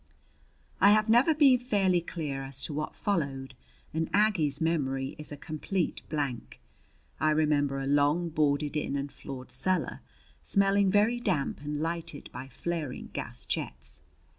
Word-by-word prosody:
I 200 +1 +7
have 215 +1 +3
never 250 +8 +5
been 275 -4 +6
fairly 195 -7 +2
clear 150 -5 -4
as 135 0 -1
to - - -3
what 150 +1 -3
followed 140 -9 -2 0.4
and 160 0 -1
Aggie's 175 -10 +2
memory 135 -5 0
is 150 - -5
a 145 - -6
complete 160 +5 -2
blank. 140 -6 -3 0.6
I 155 - +3
remember 150 -3 +2
a 135 - -3
long, 145 +5 +2
boarded 150 -1 +1
in 150 -2 -1
and 140 0 -3
floored 130 -2 -8
cellar, 180 +9 -1 0.4
smelling 200 0 +3
very 210 +5 +3
damp 180 -15 -1
and 150 0 -3
lighted 165 -2 -4
by 130 - -7
flaring 155 0 -4
gas - - -4
jets. 65 +1 -4
155 Hz, 145 wpm, -29 LUFS, 140-190 Hz, 0.6 s, I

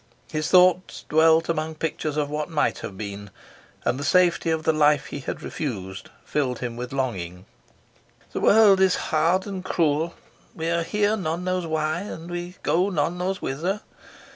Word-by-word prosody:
His 155 0 -2
thoughts 180 0 +4
dwelt 160 +1 +4
among 160 -1 -2
pictures 155 -1 -3
of 150 -1 +1
what 150 +2 -3
might 160 -3 0
have 95 - -7
been, 100 -1 -6 0.6
and 125 - 0
the - - -3
safety 175 +2 +3
of 160 -1 0
the 160 - +3
life 150 -2 +3
he - - -6
had 130 - -6
refused 95 - -5 0.2
filled 130 -5 -1
him 120 -1 -5
with 125 +1 -6
longing. 95 -9 -3 0.9
"The - - -3
world 205 -3 +6
is 190 -1 +4
hard 165 +4 +1
and 195 -3 -5
cruel. 165 -2 0 0.4
We 165 +1 -2
are 170 0 +1
here 205 +5 +1
none 175 -3 -3
knows 185 -1 -1
why, 155 0 -1
and 175 -3 -7
we 175 +1 -5
go 180 +4 +2
none 170 0 -1
knows 190 +2 -2
whither. 175 +10 -2
160 Hz, 170 wpm, -24 LUFS, 145-180 Hz, 0.9 s, world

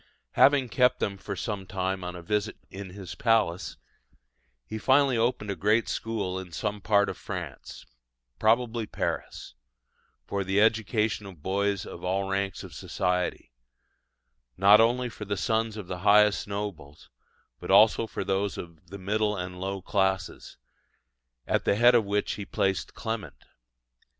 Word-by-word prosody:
Having 140 -3 +4
kept 125 +1 +3
them 100 - -1
for 100 +1 -6
some 100 -1 -4
time 95 0 -2
on 90 0 -5
a 85 - -9
visit 105 +4 -1
in 100 0 -7
his 95 -1 -8
palace, 105 -7 +1 0.9
he 110 - -6
finally 135 +2 +4
opened 115 -3 0
a - - -3
great 105 +4 +2
school 100 -5 -3
in 95 -2 -9
some 105 +4 -3
part 100 0 +3
of - - -5
France - - -7 0.5
probably 115 0 +2
Paris - - -4 0.7
for 100 +6 -2
the 95 +1 +1
education 110 -1 +1
of 85 -7 -13
boys 100 0 0
of 85 - -9
all 95 +2 -1
ranks 95 0 -2
of - - -10
society, 90 -7 -2 1.1
not 100 +3 +7
only 120 +2 +2
for 110 -2 -8
the 100 0 -2
sons 110 +4 0
of 105 - -6
the 90 0 -6
highest 105 +2 +4
nobles, 100 -8 -6 0.5
but - - -8
also 110 +3 +5
for - - -4
those 95 +1 -1
of 85 -1 -10
the 100 - -7
middle 105 +2 0
and 90 0 -5
low 95 -1 -4
classes, 95 -3 -1 0.9
at - - 0
the - - +2
head 120 +3 +6
of 115 -3 +4
which 100 +1 0
he 105 - -4
placed 95 -2 -1
Clement. 110 - -5
100 Hz, 155 wpm, -27 LUFS, 95-110 Hz, 1.1 s, not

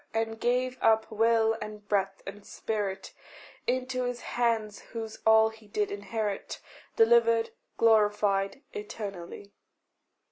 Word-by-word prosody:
and 225 0 -1
gave 250 +2 0
up 220 0 +3
will 225 0 +3
and 210 -1 -8
breath 195 -1 0
and 200 +1 -8
spirit 205 -2 -4 0.5
Into 255 0 -1
his 245 0 -3
hands 225 -3 -1
whose 225 -1 -6
all 220 0 +6
he 220 -1 -16
did 415 - -1
inherit 220 - -4 0.4
Delivered, 230 0 +4 0.3
glorified 210 0 +2
eternally. 200 -2 -7
220 Hz, 110 wpm, -29 LUFS, 205-230 Hz, 0.5 s, all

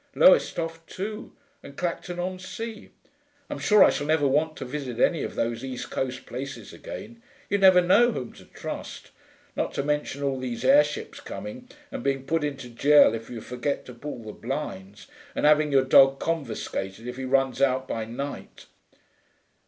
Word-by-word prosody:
Lowestoft 165 - +3
too, 210 +3 -5 0.3
and 140 - -12
Clacton 175 0 -3
on 185 +1 -3
Sea. 220 +3 -7 0.6
I'm - - -4
sure 210 0 +6
I - - +6
shall 145 - -3
never 155 -2 +3
want 155 +3 +1
to - - -5
visit 130 -2 -5
any - - +3
of - - -4
those 115 +1 -2
East 130 -2 -6
Coast 130 0 -3
places 135 +3 -7
again; 230 +3 -9 0.3
you'd 200 -1 +1
never 185 -2 +8
know 210 +7 +5
whom 125 - -5
to - - -15
trust; - - -8 0.4
not - - -2
to 140 - 0
mention 150 -1 -2
all 135 -2 0
these 125 -2 -4
airships 285 +2 +3
coming, 255 -1 -8 0.2
and - - -5
being 135 0 -1
put 160 +2 0
into 140 -3 -4
gaol 140 +2 +5
if 115 0 -6
you 120 -2 -6
forget 125 +5 -3
to 125 - -10
pull 120 -1 -7
the 110 - -7
blinds, 155 - -6 0.3
and - - 0
having 150 0 +5
your 135 -1 +4
dog 135 +1 +6
confiscated 115 -8 -3
if 125 0 -6
he 130 - -5
runs 135 0 +1
out 130 -1 +2
by 115 - -2
night.... 130 +6 -7
140 Hz, 175 wpm, -26 LUFS, 130-175 Hz, 0.6 s, never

